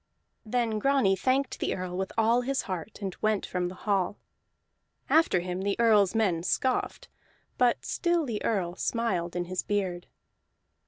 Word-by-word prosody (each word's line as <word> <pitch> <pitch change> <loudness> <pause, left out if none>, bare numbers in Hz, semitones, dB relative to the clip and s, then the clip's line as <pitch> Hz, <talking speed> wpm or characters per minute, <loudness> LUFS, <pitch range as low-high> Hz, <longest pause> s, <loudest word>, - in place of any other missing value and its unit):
Then 225 -1 0
Grani 265 -6 +3
thanked 260 +5 0
the - - -1
Earl 180 -1 -5
with 190 +1 -3
all 230 +2 +4
his 270 +2 -1
heart, 190 +2 -6
and 190 -2 -3
went 215 -2 +1
from 180 -1 -2
the 180 - -7
hall; 200 -2 +1 0.9
after 320 - +4
him 180 +1 -4
the 200 +2 -1
Earl's 215 -4 +4
men 190 -7 +2
scoffed, 255 +8 -1 0.5
but 245 -1 +2
still 345 -2 +1
the 225 -5 -4
Earl 185 -6 0
smiled 185 -7 -1
in 175 0 -1
his 180 +1 -2
beard. 185 -4 -2
205 Hz, 155 wpm, -28 LUFS, 180-235 Hz, 0.9 s, all